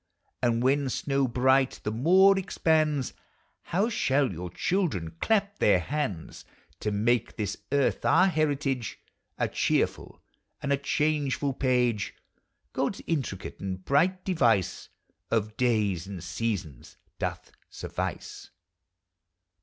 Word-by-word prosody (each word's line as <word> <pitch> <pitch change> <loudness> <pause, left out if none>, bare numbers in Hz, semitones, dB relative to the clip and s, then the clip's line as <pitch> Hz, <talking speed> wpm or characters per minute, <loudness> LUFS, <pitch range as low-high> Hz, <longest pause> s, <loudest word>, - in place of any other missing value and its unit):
And 120 -1 +1
when 135 +1 +2
snow 135 +1 0
bright 130 +2 +2
the 105 - -1
moor 185 - +5
expands. 155 -7 +1 0.5
How 195 +6 +1
shall 140 - +1
your 90 +1 -6
children 135 - -1
clap 205 -2 +1
their 100 - +4
hands! 120 - -4 0.4
To 105 - -2
make 115 +4 +1
this 105 -4 -2 0.2
earth 140 -2 +1
our 185 - +5
heritage, 145 - 0 0.4
A - - +1
cheerful - - -1 0.4
and 140 - 0
a - - +2
changeful 145 -1 0
page, 125 -5 0 0.6
Gods 165 +9 -2
intricate 135 - -3
and 95 -1 -5
bright 180 +6 +2
device 120 - +1 0.4
Of 110 -1 0
days 105 -8 +1
and 95 -4 -7
seasons 85 - -4 0.2
doth - - -4 0.2
suffice. - - -5
130 Hz, 115 wpm, -28 LUFS, 105-150 Hz, 0.6 s, moor